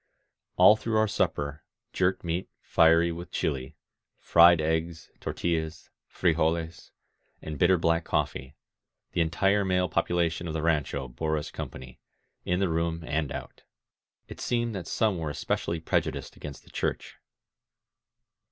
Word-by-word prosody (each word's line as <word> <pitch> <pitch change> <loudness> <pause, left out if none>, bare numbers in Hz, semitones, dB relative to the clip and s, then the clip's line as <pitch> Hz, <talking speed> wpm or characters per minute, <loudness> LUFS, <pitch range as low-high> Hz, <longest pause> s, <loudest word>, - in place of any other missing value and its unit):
All 105 - +8
through 110 0 -1
our 110 0 +3
supper 75 -6 -1 0.2
— - - -53
^jerked 95 0 +1
meat 85 +2 -2
fiery 80 +1 +4
with 85 +1 -7
chUe, 65 -2 -2 0.4
fried 85 0 +6
eggs, 80 +1 -2
tortUlaSy 80 -1 -3 0.2
frijoles, 85 0 0 0.5
and 75 -2 -7
bitter 90 +1 +5
black 85 0 +1
coffee, 65 -2 -2 0.3
— - - -58
the - - 0
entire 95 +5 +2
male 90 -1 +1
population 85 0 0
of 80 - -4
the 80 - -2
rancho 75 -4 0
bore 80 +6 -2
us 75 0 -5
company, 65 -1 -8 0.5
in 90 +1 0
the 95 - +2
room 85 0 -1
and 75 -1 -1
out. - - -7 0.7
It - - -10
seemed 120 -1 0
that 95 -4 -5
some 105 -6 +1
were 80 -2 -3
especially 85 +3 -2
prejudiced 80 - -2
against 75 -2 -9
the - - -19
Church. - - -3
85 Hz, 145 wpm, -28 LUFS, 80-90 Hz, 0.7 s, All